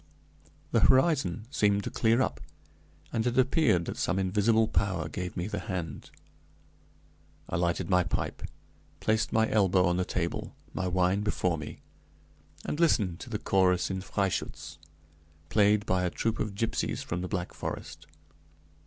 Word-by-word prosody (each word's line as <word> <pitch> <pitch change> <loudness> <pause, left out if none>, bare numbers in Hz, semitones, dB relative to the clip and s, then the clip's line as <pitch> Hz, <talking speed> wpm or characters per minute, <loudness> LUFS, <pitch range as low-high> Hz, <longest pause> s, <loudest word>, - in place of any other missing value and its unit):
The - - +3
horizon 130 - +3
seemed 100 -4 +2
to - - -4
clear 115 +3 +3
up, - - -3 0.7
and 115 0 0
it 120 - -1
appeared 130 - +3
that - - -5
some 90 - 0
invisible 105 +4 +2
power 90 -5 0
gave 90 +3 -5
me 90 - -1
the 105 0 -3
hand. 90 -5 -5 1.4
I - - -2
lighted 85 0 0
my 90 0 +3
pipe, 85 - -3 0.6
placed 110 0 +1
my 110 0 +3
elbow 95 -3 +4
on 90 0 +1
the 90 - +1
table, 85 -2 -3 0.2
my 95 - -2
wine 90 +2 +2
before 95 -4 0
me, 75 - -8 0.8
and 150 - -3
listened 105 - +2
to 130 - -9
the 110 - -2
chorus 95 -2 +2
in 95 0 -3
"Freischütz," 95 -6 -3 0.7
played 105 +4 +3
by 90 -2 +1
a 90 - +1
troupe 110 +5 -2
of 105 -2 -2
gypsies 115 +2 -1
from 85 +1 -3
the 90 - -3
Black 90 -2 -3
Forest. - - -6
95 Hz, 155 wpm, -29 LUFS, 90-110 Hz, 1.4 s, elbow